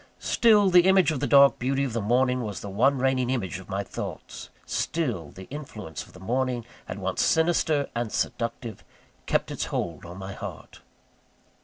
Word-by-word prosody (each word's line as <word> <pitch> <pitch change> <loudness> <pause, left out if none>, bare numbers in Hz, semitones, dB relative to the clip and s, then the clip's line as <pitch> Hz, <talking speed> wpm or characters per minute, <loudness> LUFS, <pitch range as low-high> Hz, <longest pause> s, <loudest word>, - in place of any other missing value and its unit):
Still, 210 -4 +4
the 180 0 +6
image 190 -3 +5
of 150 - -2
the 145 - -1
dark 140 -1 +6
beauty 135 +2 0
of 130 -4 -2
the 115 - -1
morning 125 +4 +2
was 105 -4 -5
the 100 - -6
one 135 +8 +3
reigning 130 -1 +1
image 100 -8 -2
of 95 - -13
my 100 0 -2
thoughts - - -7 0.2
still, 120 - -2
the 95 - -11
influence 110 - -7
of - - -18
the 90 - -13
morning, 125 +3 -1 0.2
at - - -4
once - - -2
sinister 160 -3 +2
and 120 -2 -2
seductive, 115 -2 -3 0.4
kept - - 0
its - - -2
hold 85 -4 -3
on 90 +1 -9
my 95 0 -6
heart. - - -9
125 Hz, 180 wpm, -26 LUFS, 100-140 Hz, 0.4 s, the